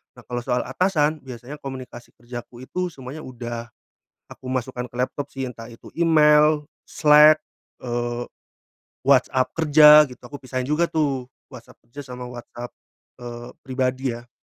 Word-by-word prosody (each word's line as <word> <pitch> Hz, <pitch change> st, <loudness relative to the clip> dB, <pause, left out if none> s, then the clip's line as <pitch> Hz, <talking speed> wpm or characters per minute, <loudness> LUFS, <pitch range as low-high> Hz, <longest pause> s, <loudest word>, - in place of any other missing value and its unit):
Nah -, -, -15 dB
kalau 120 Hz, 0 st, -4 dB
soal 125 Hz, +1 st, -1 dB
atasan 155 Hz, -5 st, +1 dB
biasanya 130 Hz, +3 st, -10 dB
komunikasi 130 Hz, -3 st, -9 dB
kerjaku 120 Hz, +1 st, -10 dB
itu 180 Hz, +6 st, -3 dB
semuanya 140 Hz, -1 st, -9 dB
udah 120 Hz, -2 st, -6 dB, 0.6 s
aku 130 Hz, -, -11 dB
masukkan 125 Hz, -1 st, -3 dB
ke 120 Hz, -, -18 dB
laptop 135 Hz, +3 st, -2 dB
sih 135 Hz, -1 st, -4 dB
entah 115 Hz, -2 st, -7 dB
itu 115 Hz, -1 st, -14 dB
email, 150 Hz, -2 st, +5 dB, 0.2 s
Slack, 150 Hz, 0 st, +6 dB, 0.4 s
eee, 120 Hz, 0 st, -2 dB, 0.8 s
WhatsApp 130 Hz, -1 st, +3 dB
kerja 150 Hz, -1 st, +8 dB
gitu -, -, -12 dB
aku 145 Hz, -, -10 dB
pisahin 130 Hz, 0 st, -3 dB
juga 165 Hz, +3 st, +1 dB
tuh 135 Hz, -5 st, -1 dB, 0.2 s
WhatsApp -, -, -14 dB
kerja 145 Hz, +5 st, -9 dB
sama 125 Hz, 0 st, -7 dB
WhatsApp, 120 Hz, 0 st, -9 dB, 0.5 s
eee, 120 Hz, 0 st, -8 dB
pribadi 130 Hz, 0 st, -1 dB
ya. 120 Hz, +1 st, -9 dB
130 Hz, 140 wpm, -23 LUFS, 120-150 Hz, 0.8 s, kerja